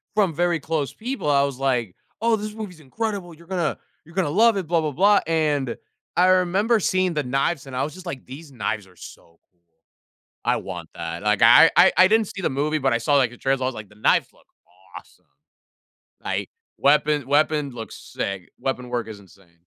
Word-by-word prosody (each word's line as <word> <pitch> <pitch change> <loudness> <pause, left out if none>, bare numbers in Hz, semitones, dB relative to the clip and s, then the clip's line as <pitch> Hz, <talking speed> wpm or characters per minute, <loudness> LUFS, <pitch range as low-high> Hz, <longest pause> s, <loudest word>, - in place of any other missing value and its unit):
from 200 -6 +2
very 175 +1 +1
close 155 -2 -2
people 245 - -4
I 140 -1 +4
was 140 -2 -2
like, 125 -8 -1 0.3
"Oh, 230 0 +3
this 210 0 -5
movie's 210 -6 -8
incredible, 190 - -4
you're 165 +1 -17
gonna 175 -4 -1 0.3
you're 165 +2 -18
gonna 190 -6 +1
love 220 +6 +4
it, 190 - -2
'blah 170 0 +2
blah 155 - -2
blah'." 200 +7 +4
And, 150 -6 0 0.4
I 180 - +5
remember 185 +5 +3
seeing 185 -1 +1
the 150 -2 -1
knives, 135 +3 -1
and 130 - -8
I 130 - 0
was 150 - -7
just 185 0 -12
like, 140 -7 -6
"These 140 +4 -11
knives 110 -4 -3
are 90 -1 -22
so 85 0 -14
cool. 85 -2 -47 0.6
I - - +2
want - - -7
that." 85 +1 -6
Like, 105 -1 +1
I - - +8
I - - +7
I 185 - +7
didn't 220 0 +2
see 195 - -7
the - - +1
movie, 150 +3 0
but 135 -2 +1
I 115 - +2
saw, 145 +5 +2
like, 130 -4 +3
the 125 - -13
trailers. 135 0 0
I - - -1
was 130 - -2
like, 110 -2 -9
"The 105 - -20
knives 105 - +2
look - - -26 0.5
awesome." - - -14 1.0
Like, - - -3 0.3
weapon 150 0 +2
weapon 150 0 +1
looks 115 -2 -8
sick, 100 -2 -5
weapon 125 -2 -3
work 120 -2 -2
is 110 -2 -9
insane. 90 -3 -22
145 Hz, 210 wpm, -23 LUFS, 125-180 Hz, 1.0 s, I